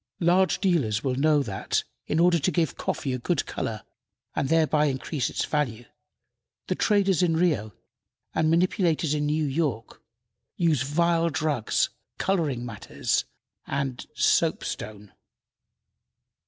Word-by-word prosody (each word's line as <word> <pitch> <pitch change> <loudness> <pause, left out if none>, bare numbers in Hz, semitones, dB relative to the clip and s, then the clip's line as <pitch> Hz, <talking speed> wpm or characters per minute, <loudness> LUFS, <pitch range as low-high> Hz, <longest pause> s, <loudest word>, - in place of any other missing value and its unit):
Large 180 +1 +3
dealers 140 - +1
well 130 - 0
know 145 +2 +3
that, 100 -6 -2 0.2
in 155 - 0
order 170 0 +4
to 155 - +1
give 165 -5 0
coffee 135 - -2
a 130 - -2
good 165 +5 0
color 110 -3 -4 0.5
and 135 - 0
thereby 155 -2 +3
increase 140 0 -1
its - - -2
value, 120 -6 -2 0.8
the - - 0
traders 200 -4 +2
in 165 -3 +2
Rio 150 - +1 0.6
and 160 0 +2
manipulators 165 -2 +2
in 150 -1 0
New 155 +1 +1
York 135 -6 -2 0.5
use 160 -7 +2
vile 170 +4 +2
drugs, 150 -7 0 0.3
coloring 155 -11 0
matter, 115 -4 -10 0.6
and 135 -3 -3
soapstone. 105 -1 0
150 Hz, 125 wpm, -26 LUFS, 130-170 Hz, 0.8 s, order